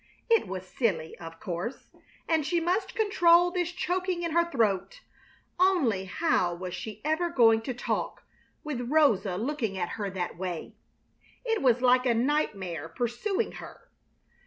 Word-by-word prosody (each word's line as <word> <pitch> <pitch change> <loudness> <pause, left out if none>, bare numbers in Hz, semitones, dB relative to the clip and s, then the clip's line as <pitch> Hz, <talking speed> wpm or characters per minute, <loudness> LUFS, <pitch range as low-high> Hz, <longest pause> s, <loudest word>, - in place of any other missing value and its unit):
It 455 - +4
was 185 0 -6
silly, 180 -9 -1
of 165 -1 -9
course, 185 +6 -5 0.4
and 320 -2 +2
she 340 +4 +1
must 360 +5 -1
control 355 -6 +4
this 355 -1 -1
choking 360 0 -2
in 335 - -1
her 340 +1 +2
throat, 230 - 0 0.6
only 290 - +3
how 185 - +1
was 180 0 -6
she 210 +3 -7
ever 315 +3 +1
going 225 -7 +5
to 250 +3 -4
talk, - - -3 0.4
with 245 -5 -4
Rosa 215 -12 +3
looking 230 -4 -2
at 175 -2 -2
her 205 -3 -3
that 180 -2 -4
way? 180 -3 -4 0.7
It 450 -2 0
was 250 -1 +3
like 250 0 +4
a 235 - +3
nightmare 195 - -1
pursuing 245 - -2
her. - - -13
245 Hz, 150 wpm, -28 LUFS, -, 0.7 s, going